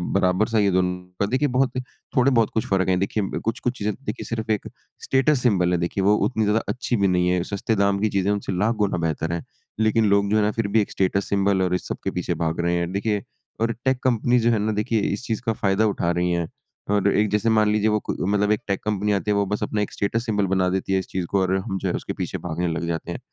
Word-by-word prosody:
बराबर 95 +2 +2
सा - - +3
ही 105 - +4
है 100 - +3
दोनों 90 0 +1 0.2
का 100 - +2
देखिए 130 +8 +1
बहुत 130 +1 +1 0.4
थोड़े 130 +1 +4
बहुत 115 -4 +3
कुछ 110 - 0
फ़र्क 95 -1 +2
है। 90 - +3
देखिए 100 0 -2
कुछ-कुछ 125 +2 -1
चीज़ें 105 +1 -1
देखिए - - -4
सिर्फ़ 110 -1 -3
एक 105 - -1 0.4
स्टेटस 135 +1 +2
सिंबल 90 -7 +3
है, 90 - +2
देखिए 85 +3 -1
वो 105 +2 +5
उतनी 110 -4 0
ज़्यादा 105 +2 +2
अच्छी 125 0 -1
भी - - +5
नहीं 90 -1 +2
है। 90 0 +1
सस्ते 105 +3 0
दाम 100 0 +2
की 110 - +1
चीज़ें 95 +1 +2
उनसे 100 -1 -2
लाख 110 +5 +1
गुना 100 - 0
बेहतर 80 +1 -2
है। 85 - -3 0.4
लेकिन 110 0 +3
लोग 100 0 +3
जो 110 - +4
है - - +3
ना 105 - +2
फिर 115 - +1
भी 110 +2 +3
एक 105 - -4
स्टेटस 95 +1 0
सिंबल 100 -1 +2
और 90 0 +1
इस 90 - -4
सब - - -4
के - - -1
पीछे - - -2
भाग 80 +1 -1
रहे 85 0 +1
हैं। 85 0 -1
देखिए 100 0 -1 0.4
और 115 0 +2
टेक 130 -1 +3
कंपनी 125 0 +2
जो 120 +1 +3
है 115 - +2
ना 105 +1 0
देखिए 115 -1 0 0.2
इस 115 - -10
चीज़ 110 -1 -2
का 115 - +1
फ़ायदा 100 0 +1
उठा 85 - 0
रही 90 0 +1
है। 85 -1 0 0.4
और 100 -1 +2
एक 105 0 +2
जैसे 105 +3 +1
मान 105 -1 +4
लीजिए 105 0 +2
वो 105 - +1
क - - +3 0.2
मतलब 105 +1 +2
एक 105 - +2
टेक 100 -1 0
कंपनी 105 -1 0
आती 100 +1 0
है - - +2
वो 100 0 +2
बस 105 +2 -3
अपना 105 - -1
एक 105 - -2
स्टेटस 115 +3 -1
सिंबल 105 -4 +1
बना 95 -1 +2
देती 95 +1 -1
है 95 - +3
इस 95 - -6
चीज़ 95 -2 -3
को 100 - +3
और 95 0 +1
हम 95 0 -3
जो - - -1
है - - -1
उसके - - -4
पीछे - - -4
भागने 85 +1 -1
लग 85 0 -2
जाते 80 -1 -3
हैं। - - -5
100 Hz, 275 wpm, -23 LUFS, 95-110 Hz, 0.4 s, वो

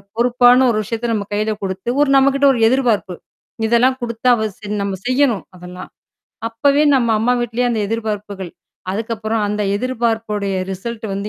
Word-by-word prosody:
பொறுப்பான 245 +1 +4
ஒரு 220 - 0
விஷயத்த 230 +2 -3
நம்ம 205 -2 -2
கையில 215 +1 0
கொடுத்து 190 +4 -4
ஒரு 280 - -1
நம்மகிட்ட 275 +1 +3
ஒரு 235 - -2
எதிர்பார்ப்பு. 225 -7 +1 0.5
இதெல்லாம் 245 +3 +3
குடுத்தா 235 +1 -1
அவ 220 -1 -2
ச - - -30 0.2
நம்ம 200 -1 -2
செய்யணும் 255 -5 +1
அதெல்லாம். 180 +1 -10 0.6
அப்பவே 280 +6 +2
நம்ம 245 -3 +2
அம்மா 240 +3 +2
வீட்டிலேயே 240 +1 -1
அந்த 225 - -1
எதிர்பார்ப்புகள். 210 -4 -4 0.4
அதுக்கப்புறம் 220 +1 -2
அந்த 210 0 -2
எதிர்பார்ப்புடைய 225 -4 -2 0.2
ரிசல்ட் 220 +4 -6
வந்து 200 +2 -4
225 Hz, 150 wpm, -18 LUFS, 205-245 Hz, 0.6 s, பொறுப்பான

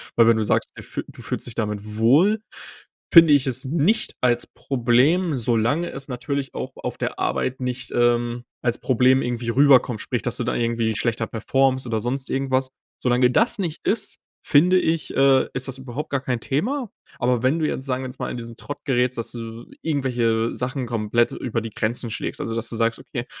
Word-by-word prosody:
weil, 115 - +6
wenn 115 -1 +5
du 110 - +1
sagst, - - 0
du - - -10
f - - -5
du - - -13
fühlst - - -4
dich 120 - -6
damit 105 -1 -4
wohl, 155 - +4 0.7
finde 165 -3 +9
ich 140 -2 +4
es 130 0 +2
nicht 170 +10 +1
als 120 -1 +2
Problem, 135 +6 +1
solange 120 +8 +1
es 135 +1 -4
natürlich 135 +2 -4
auch - - -4
auf - - -5
der - - -4
Arbeit 130 +1 -1
nicht, 125 0 -3
ähm, 120 0 +1 0.2
als 120 -1 0
Problem 130 +1 +3
irgendwie 120 -1 -3
rüberkommt. 130 -4 +4
Sprich, 125 - -3
dass 120 - -2
du 125 - -2
dann 120 - -1
irgendwie 115 -2 0
schlechter 115 -1 -1
performst 130 +3 +1
oder 110 -1 -1
sonst 130 +3 0
irgendwas. 130 -1 0 0.3
Solange 125 0 +3
das 230 - +2
nicht 170 -4 -4
ist, 205 -2 0 0.3
finde 180 +5 +5
ich, 160 -2 -1
äh, 135 -1 +4
ist 130 +1 -2
das 135 0 -4
überhaupt 130 +3 -6
gar 140 -1 0
kein 125 -3 -2
Thema. 225 - -2 0.3
Aber 125 -1 +1
wenn 135 +6 +3
du 155 - +1
jetzt, 130 - -2
sagen 130 0 -2
wir 130 - -4
jetzt - - -10
mal, - - -3
in - - -5
diesen 115 -1 -8
Trott 145 - -7
gerätst, 125 -1 +1
dass 115 - -3
du 115 0 -8 0.2
irgendwelche 120 -7 0
Sachen 130 +1 -2
komplett 115 0 +1
über 115 -2 -3
die 115 -1 -6
Grenzen 115 +2 -2
schlägst, - - -4
also, 115 - -3
dass 115 0 0
du - - -3
sagst: 115 0 0
„Okay, 120 -1 -6
125 Hz, 205 wpm, -23 LUFS, 115-135 Hz, 0.7 s, finde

